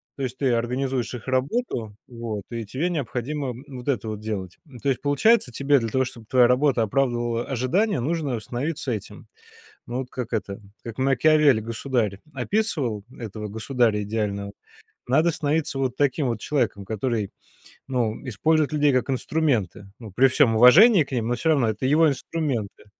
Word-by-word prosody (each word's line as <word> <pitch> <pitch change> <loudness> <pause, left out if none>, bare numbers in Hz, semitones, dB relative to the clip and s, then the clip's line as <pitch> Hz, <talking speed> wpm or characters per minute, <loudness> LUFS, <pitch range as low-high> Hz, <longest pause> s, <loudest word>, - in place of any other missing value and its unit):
То 135 - -5
есть 130 0 -4
ты 130 -2 +1
организуешь 125 +2 -1
их 120 - -10
работу, 130 - -1
вот, 115 -4 -5
и 115 -2 -4
тебе 145 - -2
необходимо, 140 -1 -3
м, 125 +1 -7
вот 130 -1 -9
это 125 -5 -1
вот 105 - -5
делать. 100 -4 -5
Ну, 140 -5 -13
то 140 - -1
есть 130 - 0
получается, 145 - +3
тебе 140 +3 +2
для 115 -2 -3
того, 130 +3 +1
чтоб 115 -2 -9
твоя 125 0 +5
работа 125 -1 +2
оправдывала 120 0 0
ожидания, 135 - 0
нужно 145 -2 -1
становиться 130 +5 -3
этим, 105 -4 -6 0.6
ну, 120 +2 -3
вот 130 - -4
как 125 -2 -5
это, 100 -3 -3 0.2
как 115 +1 -8
Макиавелли 135 0 +4
"Государь" 115 -2 -2
описывал 135 - -1
этого 110 -2 -6
государя 110 0 0
идеального. 100 -1 -3 0.6
Надо 155 +7 +3
становиться 150 -2 -1
вот 130 -2 -1
таким 145 0 +1
вот 115 -3 -2
человеком, 115 -7 -1
который, 110 -1 -2 0.6
ну, 120 -5 0
использует 155 +6 +1
людей 150 -1 +3
как 130 +2 +1
инструменты. 125 - -1
Ну, 115 -3 -10
при 135 +6 +5
всём 130 -4 +3
уважении 165 - +7
к 140 - -15
ним, 115 -3 -1
но 120 - +1
всё 160 +6 0
равно 135 -7 +3
это 110 +4 -3
его 155 +4 +4
инструменты. 135 -7 -3
125 Hz, 170 wpm, -24 LUFS, 115-145 Hz, 0.6 s, уважении